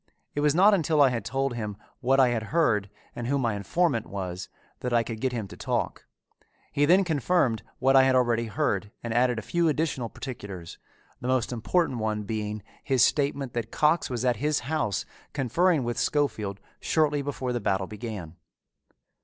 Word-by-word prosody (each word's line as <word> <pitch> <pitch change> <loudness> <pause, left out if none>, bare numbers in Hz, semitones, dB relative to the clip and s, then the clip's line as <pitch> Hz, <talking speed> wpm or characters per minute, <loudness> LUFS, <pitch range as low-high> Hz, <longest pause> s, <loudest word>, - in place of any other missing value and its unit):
It - - -2
was 150 0 +3
not 200 +4 +6
until 160 -5 +2
I 140 -2 +7
had 115 -4 -2
told 135 +3 -1
him 105 -4 -4 0.2
what 135 +1 +2
I 130 -2 +6
had 115 -2 -1
heard 115 -12 +2 0.3
and 120 - -4
who 140 +2 +1
my 120 -5 0
informant 115 - 0
was 95 -2 -5 0.3
that 125 -1 -3
I 115 -1 +4
could 115 -1 -6
get 130 - +1
him 115 -5 -3
to - - -10
talk. - - -2 0.6
He 145 0 +2
then 185 +5 +5
confirmed 145 - +1 0.2
what 135 +1 +3
I 135 - +9
had 130 0 +4
already 120 -2 +2
heard 100 -1 -1
and 115 -1 -3
added 125 0 +3
a 110 - -4
few 170 +5 +1
additional 150 -6 0
particulars, 100 -11 -8 0.4
the 125 - -5
most 130 -2 +1
important 125 +3 0
one 110 -1 -1
being 105 0 -4 0.2
his 130 -3 +3
statement 140 -2 +1
that 115 -2 -3
Cox 155 +5 +2
was 125 -1 -2
at 125 -3 +2
his 150 +5 0
house 125 - -1 0.3
conferring 150 +4 +2
with 120 0 -2
Schofield 110 -9 0 0.2
shortly 150 -2 +1
before 135 -3 -3
the 120 - -1
battle 95 -2 0
began. 105 -6 -7
125 Hz, 185 wpm, -27 LUFS, 110-145 Hz, 0.6 s, I